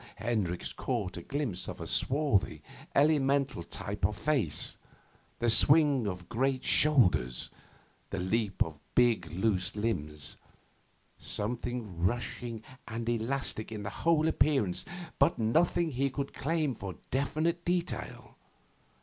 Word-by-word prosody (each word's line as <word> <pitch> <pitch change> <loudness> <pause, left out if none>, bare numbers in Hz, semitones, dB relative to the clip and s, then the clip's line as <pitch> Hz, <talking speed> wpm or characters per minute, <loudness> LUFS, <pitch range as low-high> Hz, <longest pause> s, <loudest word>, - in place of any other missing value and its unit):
Hendricks 105 -7 -2
caught 110 -8 -2
a - - -6
glimpse 120 -11 -3
of - - -6
a - - -5
swarthy, 140 -7 +1 0.3
elemental 140 - +3
type - - -6
of - - +2
face, 135 - 0 0.6
the 120 - 0
swing 140 0 +5
of 90 -2 -5
great 130 +2 0
shoulders, 95 - +3 0.6
the - - -4
leap 100 +3 +1
of 80 -2 -9 0.2
big 115 -10 +3
loose 95 0 +1
limbs 75 -9 -3 0.8
something 115 -3 -4
rushing 120 +2 -2 0.2
and 115 +1 -4
elastic 120 -1 -2
in 105 -2 -5
the 100 - -4
whole 160 -1 +2
appearance 135 - +1 0.3
but 140 +5 +4
nothing 160 +8 +2
he 135 +1 0
could 140 +1 -4
claim 155 -1 0
for 95 -5 -6 0.2
definite 155 +5 0
detail. 175 0 -3
120 Hz, 120 wpm, -31 LUFS, 100-140 Hz, 0.8 s, swing